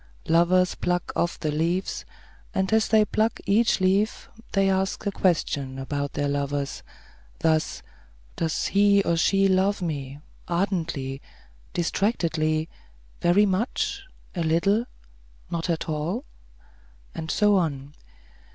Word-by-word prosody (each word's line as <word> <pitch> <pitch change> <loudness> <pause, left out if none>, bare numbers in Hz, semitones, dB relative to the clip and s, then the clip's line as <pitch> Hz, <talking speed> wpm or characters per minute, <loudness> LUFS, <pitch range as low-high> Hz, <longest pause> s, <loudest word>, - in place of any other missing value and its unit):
Lovers 175 +2 +4
pluck 180 0 -1
off 170 - 0
the 155 - -1
leaves, 170 +5 -1 0.5
and 190 +2 +1
as 220 0 +4
they 215 -1 +4
pluck 220 +2 0
each 215 +3 +3
leaf, 195 +3 +1 0.2
they 195 -1 +3
ask 190 +1 0
a 200 - +1
question 145 -8 0
about 140 +1 -3
their 145 0 -1
lovers; 140 0 -2 0.6
thus: 160 -1 +1 0.5
"Does 160 -1 -1
he 200 0 +4
or 170 - +1
she 195 +4 +3
love 190 +2 +2
me? 145 -6 -4 0.3
Ardently? 170 -7 -2 0.5
Distractedly? 165 -4 0 0.5
Very 180 +5 +5
much? 215 - -1 0.3
A 175 - -3
little? 170 +8 +2 0.7
Not 170 +1 -2
at 165 -2 -1
all?" 165 - -2 0.9
and 160 0 -6
so 210 +1 +4
on. 145 -5 -2
175 Hz, 120 wpm, -25 LUFS, 155-195 Hz, 0.9 s, Very